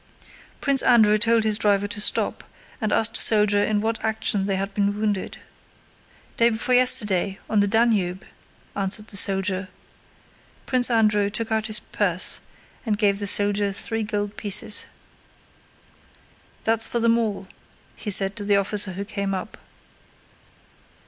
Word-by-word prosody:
Prince 275 -2 +3
Andrew 215 -3 +4
told 230 0 +2
his 215 0 0
driver 205 -1 +1
to 205 0 -3
stop, - - 0 0.4
and 215 -1 -2
asked 225 +1 +2
a - - +2
soldier 210 -2 +4
in 210 -1 0
what 225 +1 -3
action 220 -3 0
they 195 - -1
had 195 +1 -4
been 205 0 -1
wounded. 210 -3 -3 1.0
"Day 235 0 +4
before 230 +2 -1
yesterday, 205 -6 +4
on 215 - 0
the 205 - +2
Danube," 205 -4 0 0.5
answered 205 +2 -2
the - - -10
soldier. 190 -1 0 1.0
Prince 255 -1 +3
Andrew 210 -3 +2
took 225 +2 -4
out 220 0 -1
his 215 -1 -1
purse 185 -3 0 0.4
and 215 -4 -2
gave 200 -2 +1
the 205 - -3
soldier 205 0 +1
three 225 +3 -4
gold 205 -1 -4
pieces. 205 0 -2 1.8
"That's 225 0 +2
for 235 - -2
them 230 0 +2
all," 205 -4 -4 0.5
he 210 - -7
said 195 0 +3
to 205 - -5
the 200 0 +2
officer 200 -1 -1
who 200 +3 -6
came 200 -2 -3
up. 190 +3 -7
210 Hz, 150 wpm, -22 LUFS, 200-220 Hz, 1.8 s, Andrew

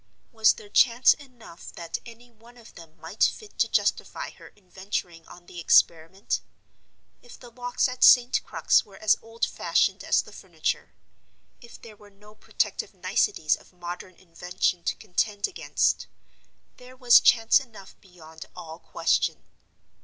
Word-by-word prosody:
Was 220 -2 +4
there 205 - -14
chance 235 +4 +4
enough 245 - -14
that 170 -1 -6
any 235 +1 -15
one 235 +2 -20
of 230 - -16
them 165 -2 -15
might 170 +6 -3
fit 430 -2 -2
to - - +3
justify - - -1
her - - -16
in 200 -3 -24
venturing 180 -3 -6
on 175 0 -15
the 175 - -11
experiment? 170 +3 +2 0.8
If 245 - -15
the 240 -2 -14
locks 245 +2 -1
at 250 0 -3
St. 245 -1 +6
Crux - - +2
were 195 -2 -17
as 215 -1 +3
old 225 +1 -3
fashioned - - 0
as - - +2
the - - -15
furniture—if 235 - -8
there 220 -2 -12
were 205 0 -18
no 210 +1 -19
protective - - -3
niceties 160 - 0
of - - -21
modern 175 +1 -8
invention 180 0 -3
to - - -1
contend 205 0 -2
against—there 255 -8 -5
was 245 -2 +7
chance 225 0 +4
enough 225 -7 -14
beyond 160 -4 -14
all 160 0 -10
question. - - -1
210 Hz, 145 wpm, -25 LUFS, 175-240 Hz, 0.8 s, was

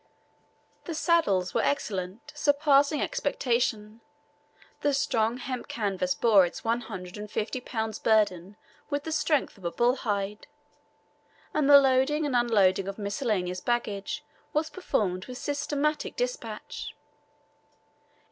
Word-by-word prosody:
The 335 - -4
saddles 205 - +2
were - - +2
excellent, 210 0 -2
surpassing 290 0 +3
expectation. 230 -5 -1 0.8
The 290 -1 +2
strong 230 -3 +1
hemp 255 -1 -5
canvas 190 -4 -1
bore 210 -3 +5
its 175 - -4
one 230 +1 0
hundred 190 -4 -8
and 210 0 -7
fifty 230 +5 -3
pounds' 220 -3 -3
burden 205 -4 +2 0.3
with 285 -1 -1
the 320 - -5
strength 300 -8 0
of 170 -2 -4
bull 245 +2 +3
hide, 205 -3 -3 1.1
and 295 -2 +2
the 285 - +11
loading 270 +3 +2
and 275 -3 -1
unloading 200 -6 +3
of 195 - -5
miscellaneous 200 -4 -1
baggage 210 -4 -2 0.3
was 310 +1 0
performed 190 - -1
with 250 -1 -7
systematic 290 +2 -1
despatch. - - -4
235 Hz, 120 wpm, -28 LUFS, 200-285 Hz, 1.1 s, the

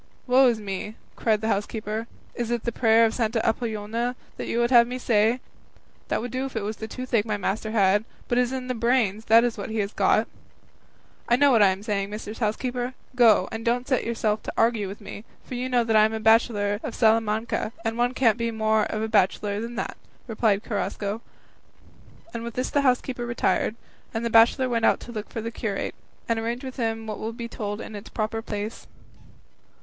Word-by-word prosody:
"Woe 260 +1 +5
is 235 -3 +1
me," 205 +1 -5 0.2
cried 215 -2 +1
the 220 - -1
housekeeper, 215 +1 -2 0.3
"is 235 -1 -3
it 240 -1 -1
the 235 - -1
prayer 225 -1 +4
of 220 - 0
Santa 225 -1 0
Apollonia 225 +1 -1 0.2
you - - -2
would 240 +1 +2
have 235 -2 +7
me 250 +1 -4
say? 230 0 +2 0.7
That - - 0
would 245 0 -5
do 255 +1 -2
if 265 - -12
it 220 - -1
was 215 +1 -4
the 220 - -6
toothache 245 -2 -1
my 210 -1 -2
master 205 +2 -2
had; 205 -1 +3 0.2
but 240 - +2
it - - +6
is 250 0 0
in 260 -1 -3
the 255 - -1
brains, 230 -3 +1
what 230 -2 +3
he 220 - -3
has 205 -1 -1
got." - - +3 1.0
"I 240 - +6
know 285 +2 +5
what 230 -4 +5
I 205 - +7
am 190 +1 -1
saying, 200 -2 -1
mistress 210 +1 -7
housekeeper; 245 +3 -2 0.2
go, 225 -6 +5
and 225 0 -5
don't 245 +2 0
set 260 - +1
yourself 220 -2 -1
to - - -6
argue 225 -3 +2
with 200 +3 -8
me, 205 0 -8 0.2
for - - -8
you 250 +1 -2
know 245 -2 +2
I 215 -1 +5
am 220 - -1
a 220 - -2
bachelor 215 -2 +3
of - - -5
Salamanca, 225 0 +1
and 225 0 0
one 245 +2 0
can't 235 -4 +3
be 230 0 0
more 220 -1 +1
of 215 0 -3
a - - -1
bachelor 205 0 +1
than 235 +1 -6
that," - - -4 0.3
replied 215 -3 +1
Carrasco; 205 0 -3 1.1
and 230 - -4
with 235 -1 -6
this 255 - -2
the 285 - +2
housekeeper 250 -2 0
retired, 235 -2 0 0.4
and 225 +1 -1
the 235 - -1
bachelor 235 +4 +5
went 230 -2 +2
to 240 - -10
look 215 -2 -6
for 225 - -5
the 230 +1 -4
curate, 215 -4 -3 0.3
and 230 -1 +1
arrange 235 +3 -3
with 260 0 -7
him 225 -2 -2
what 215 -2 -5
will 225 +1 -4
be 235 0 -6
told 205 -2 -5
in 220 - -7
its 205 +2 -9
proper 225 0 -2
place. 210 0 -5
225 Hz, 210 wpm, -25 LUFS, 215-240 Hz, 1.1 s, have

